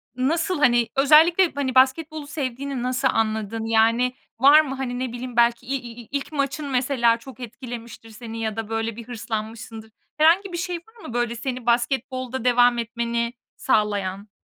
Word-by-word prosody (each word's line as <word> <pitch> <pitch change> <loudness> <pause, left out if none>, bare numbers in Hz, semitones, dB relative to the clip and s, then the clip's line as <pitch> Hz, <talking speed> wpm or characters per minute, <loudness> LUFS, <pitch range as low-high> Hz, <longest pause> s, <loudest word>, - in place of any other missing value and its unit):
nasıl, 320 +6 0
hani, 240 -4 +3
özellikle, 320 +6 +5
hani, 265 -2 -2
basketbolu 290 +3 +2
sevdiğini 275 -3 -4
nasıl 255 +1 +1
anladın? 220 0 -1
Yani, 230 +3 +2 0.3
var 285 +4 +8
mı? 270 -3 -5
Hani, 250 -2 -4
ne 255 -2 -3
bileyim, 245 0 -7
belki 235 +1 +3
i 270 - -2 0.3
i 225 - -16
ilk 280 +2 -3
maçın 285 +1 -2
mesela 250 -3 +2
çok 265 +2 -13
etkilemiştir 235 -1 -9
seni 225 0 -8
ya 220 -1 -2
da 225 -1 -5
böyle 225 0 -2
bir 235 0 -10
hırslanmışsındır. 220 -1 -6 0.3
Herhangi 350 +5 +4
bir - - -2
şey 350 +1 -3
var 445 +6 -18
mı? 235 - -8
Böyle, 240 -1 -1
seni 250 0 -5
basketbolda 255 +1 -1
devam 245 0 +4
etmeni 235 0 -2 0.2
sağlayan? 205 -3 0
245 Hz, 160 wpm, -23 LUFS, 230-275 Hz, 0.3 s, var